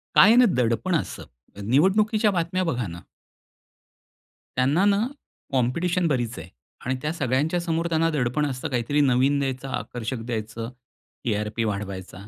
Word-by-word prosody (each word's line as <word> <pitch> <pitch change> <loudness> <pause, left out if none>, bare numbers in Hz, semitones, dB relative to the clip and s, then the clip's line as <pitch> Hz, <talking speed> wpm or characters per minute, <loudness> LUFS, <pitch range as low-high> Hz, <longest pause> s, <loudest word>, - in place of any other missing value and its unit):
काय 220 +4 +8
ना 250 0 +7
दडपण 125 +9 +1
असं, 160 - -3 0.4
निवडणुकीच्या 205 - +3
बातम्या 180 +1 0
बघा 125 - -1
ना. 85 +1 -8 1.6
त्यांना 140 +9 +3
ना, 200 -1 +4 0.5
कॉम्पिटिशन 170 +8 +1
बरीच 120 -6 -1
आहे 80 - -9 0.4
आणि 130 +1 0
त्या 150 +2 -1
सगळ्यांच्या 145 +3 0
समोर 165 0 -1
त्यांना 165 0 +2
दडपण 140 +1 0
असतं 130 -3 -3
काहीतरी 130 +4 +1
नवीन 135 +1 +3
द्यायचं 135 0 -3
आकर्षक 120 -1 -4
द्यायचं, 115 -1 -4 0.5
टी-आर-पी 105 0 -1
वाढवायचा. 100 -2 -5
130 Hz, 130 wpm, -24 LUFS, 115-165 Hz, 1.6 s, काय